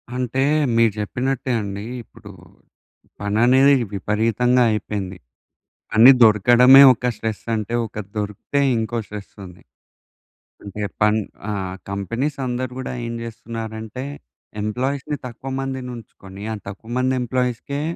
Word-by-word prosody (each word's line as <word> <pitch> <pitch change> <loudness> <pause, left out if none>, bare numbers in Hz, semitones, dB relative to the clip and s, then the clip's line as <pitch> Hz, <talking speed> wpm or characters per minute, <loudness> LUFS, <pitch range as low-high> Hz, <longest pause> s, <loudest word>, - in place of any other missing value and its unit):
అంటే 125 +1 -1 0.3
మీరు 115 -2 +4
చెప్పినట్టే 130 +5 -2
అండి. 100 0 -5 0.2
ఇప్పుడు - - -14 0.9
పని 100 +1 -1
అనేది 135 +3 +6 0.2
విపరీతంగా 115 +5 +1
అయిపోయింది. 100 -3 -3 0.8
పని 115 +4 +8
దొరకడమే 120 +5 +7
ఒక 125 0 -4
స్ట్రెస్ 110 0 -4
అంటే 110 +1 -3
ఒక - - -17 0.2
దొరికితే 105 +7 -2 0.2
ఇంకో 115 +1 -2
స్ట్రెస్ 105 -1 -9
ఉంది. 90 -1 -13 1.0
అంటే 100 +1 -7 0.2
పన్ 105 +1 +4 0.3
ఆహ్, 95 -3 -3
కంపెనీస్ 115 +9 -3
అందరూ 125 +1 -3
గూడా 130 - -4
ఏం 115 - -4
చేస్తున్నారంటే 115 0 -7 0.6
ఎంప్లాయీస్‌ని 130 +7 -2
తక్కువ 125 +2 -7
మందిని 130 -1 -4
ఉంచుకొని, 100 -3 -12
ఆ - - -3
తక్కువ 100 +3 -9
మంది 130 +1 +1
ఎంప్లాయీస్‌కే 125 +3 -2
115 Hz, 115 wpm, -21 LUFS, 105-125 Hz, 1.0 s, పని